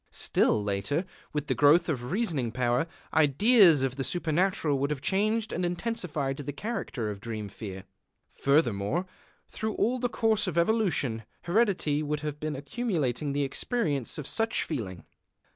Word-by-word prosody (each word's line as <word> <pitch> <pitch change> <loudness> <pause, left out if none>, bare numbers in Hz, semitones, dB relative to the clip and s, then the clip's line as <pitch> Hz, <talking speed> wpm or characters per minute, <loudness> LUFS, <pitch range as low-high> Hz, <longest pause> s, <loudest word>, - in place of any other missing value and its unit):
Still 105 - +2
later, 100 - -1 0.3
with 150 -1 -2
the - - 0
growth 150 +4 +5
of 125 -5 -3
reasoning 165 - -1
power, 125 +5 +1 0.3
ideas 160 - +5
of 135 0 -1
the 135 - -1
supernatural 165 -2 +1
would 140 +1 0
have 150 -2 -2
changed 215 - 0
and 180 - -2
intensified 175 - -2
the 145 0 -4
character 145 - -4
of 100 - -7
dream 110 -2 -5
fear. 95 -2 -8 0.5
Furthermore, 140 - +1 0.4
through 220 0 -4
all 250 +3 +1
the 245 0 0
course 220 -3 +1
of 175 -2 -3
evolution, 170 - +1 0.2
heredity 175 -7 +1
would 150 0 -2
have 150 -1 -4
been 155 0 -3
accumulating 145 - -2
the 145 +1 0
experience 145 - -2
of 150 - -5
such 225 +7 +1
feeling. 100 - -5
150 Hz, 150 wpm, -28 LUFS, 130-190 Hz, 0.5 s, growth